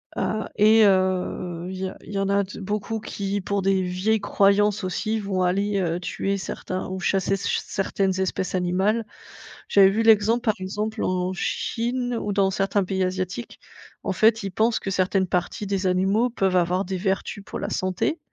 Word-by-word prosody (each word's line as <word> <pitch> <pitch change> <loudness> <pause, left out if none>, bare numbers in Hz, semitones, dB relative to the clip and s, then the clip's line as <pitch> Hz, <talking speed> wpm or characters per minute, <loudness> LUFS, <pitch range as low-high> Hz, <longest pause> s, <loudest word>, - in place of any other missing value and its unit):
Ah 215 0 -2
et 215 +1 +6
heu, 185 -2 0
il 190 - -5
y 190 0 -2
a - - -11
il 205 - -10
y - - -2
en 195 0 0
a 200 0 +3
de 200 +2 -9
beaucoup 210 +3 -3
qui, 200 -1 -3
pour 200 +1 -1
des 195 0 +2
vieilles 190 +4 0
croyances, 205 +1 +3
aussi, 215 +4 -1
vont 195 -2 -2
aller, 200 +2 +1
heu, 170 0 -1
tuer 195 +2 -2
certains 185 -1 -5
ou 185 0 -4
chasser 195 0 +1
s 195 - -1
ch - - 0
certaines 195 -1 -1
espèces 185 0 -2
animales. 190 +5 +1 0.6
J'avais 195 -1 +7
vu 220 +3 0
l'exemple, 225 +1 +4
par 215 -3 +2
exemple, 210 +4 -3
en 185 0 0
Chine 245 +5 -2
ou 205 - -2
dans 195 -1 +2
certains 195 +1 +1
pays 190 0 -1
asiatiques, 185 +4 -4 0.4
en - - -1
fait, 220 0 +3
ils 195 - -3
pensent 220 +4 +1
que 195 - -4
certaines 190 0 +1
parties 180 +3 -2
des 195 -1 -1
animaux 195 +6 +2
peuvent 195 -5 0
avoir 180 +2 +2
des 190 0 -3
vertus 195 +1 -2
pour - - -7
la - - -3
santé. 185 - -1
195 Hz, 190 wpm, -24 LUFS, 185-210 Hz, 0.6 s, J'avais